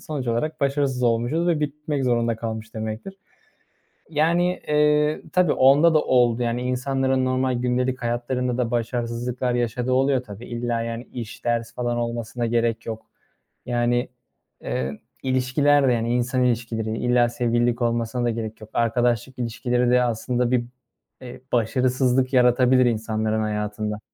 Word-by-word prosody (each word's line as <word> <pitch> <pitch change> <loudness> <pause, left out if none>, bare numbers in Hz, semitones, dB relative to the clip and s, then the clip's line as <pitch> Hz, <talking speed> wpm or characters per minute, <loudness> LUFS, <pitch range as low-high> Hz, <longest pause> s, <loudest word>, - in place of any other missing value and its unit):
sonuç 140 -5 -5
olarak 155 +7 -1
başarısız 140 -2 0
olmuşuz 120 +9 +1
ve 165 -3 +1
bitmek 150 -1 -2
zorunda 120 -2 +1
kalmış 110 -1 -6
demektir. 110 - -5 0.9
Yani, 170 +4 +1
eee, 150 0 +2
tabii 180 -3 +3
onda 145 +5 +5
da 155 - +5
oldu. 125 -2 +3
Yani, 120 +1 -1
insanların 130 +1 0
normal 130 0 +1
gündelik 125 +1 -1
hayatlarında 120 +1 -1
da 120 -2 -1
başarısızlıklar 120 +1 -2
yaşadığı 120 +1 -1
oluyor 130 0 +2
tabii. 105 +1 -10
İlla, 120 -1 -2
yani, 115 +1 -4
iş, 120 -2 -8
ders 115 -1 -1
falan 120 -1 -1
olmasına 120 0 -3
gerek 115 0 0
yok. 110 -1 -6 0.6
Yani, 120 +1 0 0.5
eee, 65 +3 -3 0.2
ilişkiler 135 +2 +2
de, 125 - +3
hani, 115 +1 -1
insan 125 +1 +1
ilişkileri, 115 -2 -1
illa 120 -1 +2
sevgililik 120 0 0
olmasına 120 +1 0
da 120 - +1
gerek 110 -1 -5
yok. 110 - -11
Arkadaşlık 120 +2 0
ilişkileri 120 +1 0
de 125 0 +4
aslında 120 +1 -1
bir, 120 -1 +1 0.6
eee, 125 0 -10
başarısızlık 130 +2 +1
yaratabilir 125 0 +4
insanların 110 -1 0
hayatında. 105 0 -3
120 Hz, 140 wpm, -23 LUFS, 115-130 Hz, 0.9 s, onda